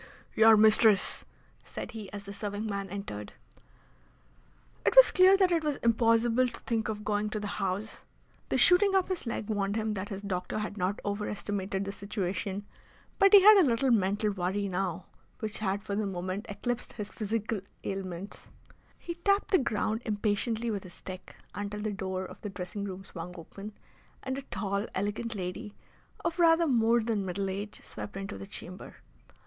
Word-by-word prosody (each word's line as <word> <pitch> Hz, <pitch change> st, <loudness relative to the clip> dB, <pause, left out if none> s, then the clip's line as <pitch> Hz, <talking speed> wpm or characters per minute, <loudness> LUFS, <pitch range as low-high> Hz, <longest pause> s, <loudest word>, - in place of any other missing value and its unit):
"Your 220 Hz, 0 st, +7 dB
mistress!" 215 Hz, -1 st, +4 dB, 0.4 s
said -, -, -7 dB
he 215 Hz, -4 st, -8 dB
as 200 Hz, 0 st, -7 dB
the 200 Hz, 0 st, -8 dB
serving 205 Hz, +1 st, -4 dB
man 200 Hz, -2 st, -3 dB
entered. 175 Hz, -, -6 dB, 1.5 s
It -, -, +2 dB
was -, -, +9 dB
clear 375 Hz, +1 st, +6 dB
that 375 Hz, -2 st, +3 dB
it 335 Hz, -2 st, +2 dB
was 300 Hz, -2 st, 0 dB
impossible 230 Hz, +1 st, +3 dB
to -, -, -8 dB
think 225 Hz, -2 st, -1 dB
of 210 Hz, -1 st, -4 dB
going 210 Hz, 0 st, 0 dB
to 215 Hz, -, -3 dB
the 205 Hz, -1 st, -4 dB
House. 195 Hz, +3 st, -3 dB, 0.5 s
The -, -, +1 dB
shooting 390 Hz, +2 st, +5 dB
up 380 Hz, -1 st, +2 dB
his 365 Hz, -9 st, -3 dB
leg 230 Hz, -2 st, -3 dB
warned 200 Hz, -2 st, -1 dB
him 220 Hz, -1 st, -1 dB
that 200 Hz, 0 st, -4 dB
his 195 Hz, 0 st, -6 dB
doctor 185 Hz, -1 st, -3 dB
had 210 Hz, -1 st, -3 dB
not 190 Hz, 0 st, -1 dB
overestimated 200 Hz, -1 st, -2 dB
the 200 Hz, -, -3 dB
situation. 200 Hz, 0 st, -3 dB, 0.5 s
But 390 Hz, 0 st, +6 dB
he 405 Hz, -, +10 dB
had 425 Hz, +1 st, +10 dB
a 385 Hz, -, +7 dB
little 250 Hz, +3 st, +2 dB
mental 205 Hz, 0 st, +2 dB
worry 195 Hz, +1 st, -1 dB
now 185 Hz, -2 st, -2 dB, 0.3 s
which 220 Hz, -1 st, -4 dB
had 200 Hz, -1 st, -1 dB
for 200 Hz, -, -3 dB
the 210 Hz, 0 st, 0 dB
moment 185 Hz, +4 st, -4 dB
eclipsed 245 Hz, +4 st, -3 dB
his 210 Hz, -2 st, -6 dB
physical 220 Hz, -1 st, -2 dB, 0.2 s
ailments. 190 Hz, -1 st, -6 dB, 0.5 s
He 340 Hz, -, -5 dB
tapped 395 Hz, +4 st, +1 dB
the 375 Hz, -, +6 dB
ground 220 Hz, -2 st, -1 dB
impatiently 220 Hz, +2 st, -1 dB
with 200 Hz, -2 st, -2 dB
his 180 Hz, -2 st, -11 dB
stick 185 Hz, -1 st, -9 dB, 0.2 s
until 205 Hz, +1 st, -4 dB
the 215 Hz, 0 st, -1 dB
door 190 Hz, -1 st, -3 dB
of -, -, -11 dB
the 210 Hz, -, -4 dB
dressing 195 Hz, +1 st, -5 dB
room 190 Hz, -1 st, -6 dB
swung 180 Hz, -1 st, -8 dB
open, 200 Hz, +5 st, -9 dB, 0.5 s
and 260 Hz, 0 st, -2 dB
a 275 Hz, -, -4 dB
tall, 200 Hz, -5 st, -3 dB
elegant 210 Hz, +4 st, -2 dB
lady 200 Hz, +3 st, -5 dB, 0.5 s
of 335 Hz, +1 st, -1 dB
rather 335 Hz, 0 st, +5 dB
more 235 Hz, -4 st, +3 dB
than 220 Hz, -3 st, -1 dB
middle 190 Hz, +1 st, -2 dB
age 205 Hz, +2 st, -5 dB
swept 200 Hz, -, -7 dB
into 195 Hz, +1 st, -6 dB
the 195 Hz, -, -8 dB
chamber. 185 Hz, -2 st, -7 dB
205 Hz, 175 wpm, -30 LUFS, 195-230 Hz, 1.5 s, he